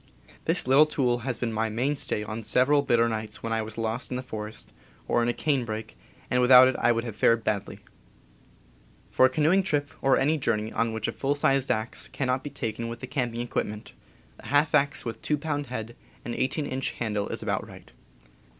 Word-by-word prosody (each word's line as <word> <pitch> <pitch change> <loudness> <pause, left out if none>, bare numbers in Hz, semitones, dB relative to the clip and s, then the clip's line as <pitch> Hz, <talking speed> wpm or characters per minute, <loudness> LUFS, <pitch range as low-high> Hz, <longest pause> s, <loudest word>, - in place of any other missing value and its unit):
This - - +1
little 135 +4 +6
tool 125 -5 0
has 125 0 -3
been 115 -2 -2
my 110 +1 0
mainstay 125 -1 -1
on 110 +2 -5
several 130 +6 +3
bitter 120 -4 +3
nights 110 -2 -4
when 115 - -2
I 110 - 0
was 110 0 -7
lost 115 +1 -2
in 125 - -3
the 130 - -5
forest, 110 -3 -6 0.4
or 120 - +2
in 120 - +1
a - - +3
canebrake, 120 -6 -2 0.4
and 125 - +3
without 125 +1 +8
it 130 - 0
I 120 - +4
would 115 0 0
have 115 -3 -6
fared 115 +1 +3
badly. 105 -3 -3 1.3
For 130 - +5
a - - -4
canoeing 155 +8 +3
trip, 145 -6 -1
or 135 -1 +4
any 155 +3 +2
journey 110 -4 -1
on 115 0 0
which 110 -1 -3
a - - -1
full 140 +1 -1
sized 135 -2 +2
axe 110 +2 -1
cannot 130 -1 -2
be 145 - -5
taken 115 -4 -4
with 115 0 -6
the - - -4
camping 125 -3 -2
equipment, 105 -3 -4 0.5
a - - -11
half 145 +2 +2
axe 140 0 +3
with 115 - -5
2 150 - 0
pound 145 -1 -3
head 120 -1 -6 0.3
and 120 - -3
18 145 +5 -1
inch 130 -1 -2
handle 105 -3 -2
is - - -4
about - - -2
right. - - -14
120 Hz, 205 wpm, -27 LUFS, 110-135 Hz, 1.3 s, without